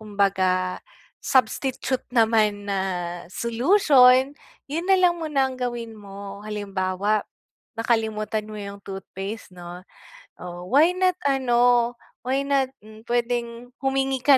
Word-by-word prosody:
kumbaga 190 -3 0 0.4
substitute 260 +1 0
naman 220 -4 +2
na 200 -1 -1 0.5
solution, 255 - +4 0.3
yun 330 +6 -4
na 385 - +6
lang 350 -2 +3
muna 275 -4 0
ang 255 - -10
gawin 240 -2 -3
mo. 200 -1 -9
Halimbawa 205 -1 -2 0.5
nakalimutan 220 -2 -1
mo 215 - -8
yung 200 -1 -7
toothpaste 195 +2 -7
'no, 175 0 -10 0.6
oh, 175 0 -8
why 320 +6 +5
not 370 -1 +2
ano 245 -3 +3 0.3
why 270 +2 -1
not, 275 -2 +1 0.2
hmm, 215 0 -13
pwedeng 240 0 -2
humingi 270 -1 0
ka 280 -1 +6
235 Hz, 115 wpm, -24 LUFS, 200-265 Hz, 0.6 s, na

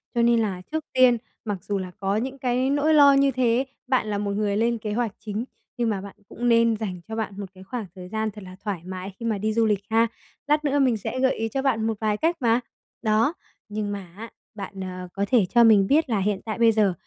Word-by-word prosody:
Cho 235 - +3
nên 235 0 +4
là 195 -5 -1
trước 315 -1 -2
tiên, 255 -2 +5 0.3
mặc 205 -2 -2
dù 200 -1 -2
là 185 -1 -5
có 195 +1 0
những 260 +5 -2
cái 255 +1 0
nỗi 290 +3 +2
lo 285 -2 +8
như 275 0 +4
thế, 250 +1 +2 0.2
bạn 255 -4 +1
là 205 -1 -1
một 200 0 -2
người 205 0 0
lên 235 +1 +1
kế 210 -1 -4
hoạch 235 -1 0
chính, 215 +2 -4 0.3
nhưng 235 -2 +1
mà 195 -3 -1
bạn 200 0 -10
cũng 240 0 -1
nên 230 -1 +4
dành 185 -5 -5
cho 220 - -5
bạn 220 -2 -3
một 200 - -4
cái 185 0 -13
khoảng 230 +1 -5
thời 180 -1 -9
gian 220 0 -2
thật 210 -1 -11
là 185 0 -10
thoải 200 -6 -3
mái 185 +1 -6
khi 230 - -5
mà 220 -3 0
đi 215 +2 -1
du 230 0 +3
lịch 205 -2 +1
ha. 225 +1 +4 0.4
Lát 300 +1 +2
nữa 285 0 +2
mình 255 -4 +3
sẽ 215 +5 -4
gợi 260 0 +3
ý 225 - -2
cho 270 - -2
bạn 225 -5 +1
một 220 -2 -2
vài 215 -1 0
cách 335 +6 +1
mà. 235 -2 +3 0.4
Đó, 220 +6 +2 0.4
nhưng 210 0 -3
mà 200 -3 -5
á, 230 +1 -7 0.3
bạn, 195 -1 -6
à, 185 -1 -6
có 200 0 -1
thể 230 -7 +5
cho 235 +5 +4
mình 205 -4 +6
biết 300 -1 +3
là 215 - +1
hiện 195 0 0
tại 215 0 -3
bây 230 -1 +5
giờ 210 -4 +2
220 Hz, 260 wpm, -24 LUFS, 200-245 Hz, 0.4 s, lo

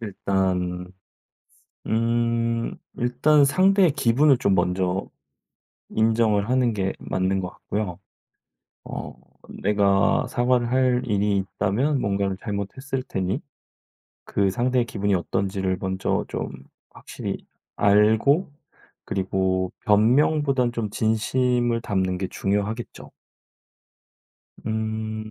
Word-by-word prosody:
일단 95 -3 -2 1.0
음 115 0 0 0.2
일단 135 +5 +3
상대의 185 +3 +4
기분을 135 +1 +3
좀 100 -6 +2
먼저 90 +1 0 0.8
인정을 110 -1 +2
하는 125 -2 +2
게 95 -2 -1
맞는 95 +1 -1
것 90 - -4
같고요. 100 -2 -4 0.9
어 - - -6 0.5
내가 100 -1 +3
사과를 120 -1 +1
할 125 -1 +2
일이 105 -1 +1
있다면 105 +9 0
뭔가를 100 -2 -1
잘못했을 120 +7 -4
테니 95 -5 -2 0.8
그 100 -1 +1
상대의 125 +4 +1
기분이 100 -3 -1
어떤지를 95 +1 -1
먼저 95 0 -1
좀 - - -3 0.4
확실히 - - -6 0.4
알고 110 - +4 0.6
그리고 95 -1 -1
변명보단 125 +4 +3
좀 110 -3 -3
진심을 120 +2 +1
담는 95 -4 -1
게 95 -1 -3
중요하겠죠. 105 +4 -3 1.5
음 110 0 -3
110 Hz, 205 characters per minute, -24 LUFS, 95-120 Hz, 1.5 s, 상대의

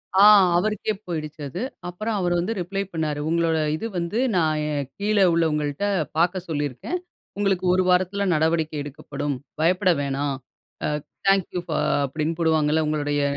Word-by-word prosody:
ஆ 195 - +7 0.3
அவருக்கே 215 +2 0
போயிடுச்சு 155 -3 -5
அது. 180 - -5 0.3
அப்புறம் 215 +5 -3
அவரு 175 -1 +1
வந்து 190 +6 -1
ரிப்ளை 195 +3 -2
பண்ணாரு. 155 -2 -1
உங்களோட 165 -1 +2 0.2
இது 225 +8 -4
வந்து 170 +6 -1 0.2
நான் 155 -2 +1 0.4
கீழே 205 -1 +3
உள்ளவங்கள்ட்ட 150 0 0 0.3
பாக்க 180 +2 +2
சொல்லியிருக்கேன். 145 - -2 0.4
உங்களுக்கு 195 -3 +1
ஒரு 185 0 +3
வாரத்துல 185 +2 +2
நடவடிக்கை 160 0 +1
எடுக்கப்படும். 145 -1 -4 0.3
பயப்பட 180 +3 +3
வேணாம். 140 0 -1 0.9
தேங்க் 195 -2 +4
யூ - - +1
ஃபார் 160 - 0 0.2
அப்பிடின்னு 155 +4 -2
போடுவாங்கல்ல, 160 -1 +2
உங்களுடைய 145 -1 0
165 Hz, 135 wpm, -24 LUFS, 150-185 Hz, 0.9 s, ஆ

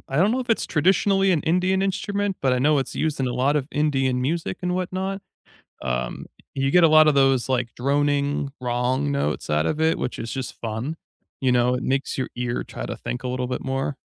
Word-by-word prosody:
I 135 - -3
don't 185 +7 +4
know 255 +3 0
if 245 - -4
it's 225 - +1
traditionally 190 +4 +3
an 155 - +2
Indian 180 +3 +2
instrument, 200 0 -1
but 130 - +3
I 125 - +2
know 145 +3 +3
it's 135 - -3
used 155 -3 -1
in 130 - 0
a 125 - -1
lot 135 +4 +1
of 135 - -1
Indian 135 -4 +1
music 160 +6 -2
and 180 0 0
whatnot. 190 +2 -3 0.6
Um, 60 -1 -3 0.3
you 135 0 0
get 175 +1 +5
a - - +7
lotta 155 -1 +6
those, 135 -3 +3
like, 125 -2 -1
droning 140 +1 0
wrong 125 +3 0
notes 75 - -2
out 75 +1 +2
of 155 - -1
it, 160 +1 +2
which - - -3
is 115 - -5
just 130 -2 -4
fun, 115 +8 -4 0.4
you 130 - +2
know? 125 0 +3
It 125 - -3
makes 135 +1 -1
your 130 - -2
ear 125 -1 -2
try - - -7
to - - -5
think 125 - -5
a - - -1
little 125 0 -2
bit 125 - -3
more. 135 +1 -2
140 Hz, 220 wpm, -23 LUFS, 125-165 Hz, 0.6 s, a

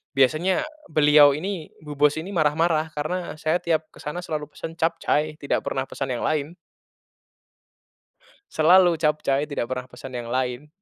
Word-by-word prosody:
biasanya 155 - +2 0.3
beliau 150 -2 +6
ini 180 -2 -5
bu 150 - -8
bos 145 0 +4
ini 170 +5 -5
marah-marah 160 -1 +1
karena 165 +4 -3
saya 160 +3 +1
tiap 160 -2 -1
kesana 150 +4 -6
selalu 150 -3 -4
pesan 160 - -7
capcay 155 -2 0
tidak 140 - 0
pernah 135 - -2
pesan 135 - -4
yang 120 - -4
lain. 155 +2 -1 2.0
Selalu 175 +1 +5
capcay 150 -2 +1
tidak 145 -5 -4
pernah 125 -1 -3
pesan 130 0 -9
yang 120 - -5
lain. 130 +2 -2
155 Hz, 145 wpm, -24 LUFS, 145-165 Hz, 2.0 s, beliau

